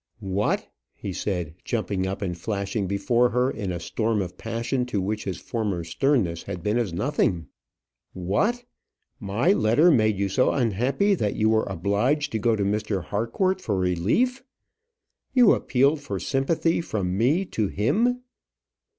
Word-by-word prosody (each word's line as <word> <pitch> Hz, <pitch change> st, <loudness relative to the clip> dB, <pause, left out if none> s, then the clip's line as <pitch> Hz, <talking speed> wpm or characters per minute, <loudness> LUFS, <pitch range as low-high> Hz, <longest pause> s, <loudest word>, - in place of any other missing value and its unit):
"What!" 100 Hz, +2 st, 0 dB, 0.3 s
he 95 Hz, -, -6 dB
said, 90 Hz, -5 st, -3 dB
jumping 95 Hz, -4 st, -1 dB
up 95 Hz, +2 st, -4 dB
and 90 Hz, -3 st, -2 dB
flashing 100 Hz, +2 st, -2 dB
before 120 Hz, +5 st, +2 dB
her 125 Hz, +2 st, +1 dB
in 100 Hz, -4 st, -4 dB
a 85 Hz, -, -3 dB
storm 110 Hz, +5 st, -1 dB
of 90 Hz, -2 st, -4 dB
passion 115 Hz, +5 st, -2 dB
to 110 Hz, -5 st, -1 dB
which 105 Hz, +3 st, -2 dB
his 95 Hz, -, -3 dB
former 105 Hz, -7 st, -3 dB
sternness 85 Hz, -, 0 dB
had 90 Hz, -4 st, -7 dB
been 105 Hz, +3 st, +1 dB
as 110 Hz, -7 st, -1 dB
nothing 90 Hz, -, 0 dB, 0.6 s
"what! 200 Hz, -, 0 dB, 0.5 s
my 115 Hz, -, +2 dB
letter 145 Hz, -, +4 dB
made 110 Hz, -7 st, +3 dB
you 100 Hz, 0 st, 0 dB
so 115 Hz, +7 st, +2 dB
unhappy 130 Hz, -, +1 dB
that 105 Hz, -, -1 dB
you 110 Hz, 0 st, +2 dB
were 110 Hz, 0 st, +2 dB
obliged 105 Hz, -, 0 dB
to 110 Hz, -, -1 dB
go 115 Hz, +1 st, +2 dB
to 105 Hz, -, -1 dB
Mr. 100 Hz, -2 st, -1 dB
Harcourt 150 Hz, -, -1 dB
for 105 Hz, -, -1 dB
relief! 95 Hz, -, +1 dB, 0.9 s
You 245 Hz, -5 st, +7 dB
appealed 140 Hz, +4 st, +2 dB
for 140 Hz, -, -4 dB
sympathy 165 Hz, +5 st, 0 dB
from 95 Hz, -, -2 dB
me 140 Hz, -, +2 dB
to 110 Hz, -2 st, 0 dB
him! 230 Hz, -, +1 dB
110 Hz, 155 wpm, -25 LUFS, 95-135 Hz, 0.9 s, You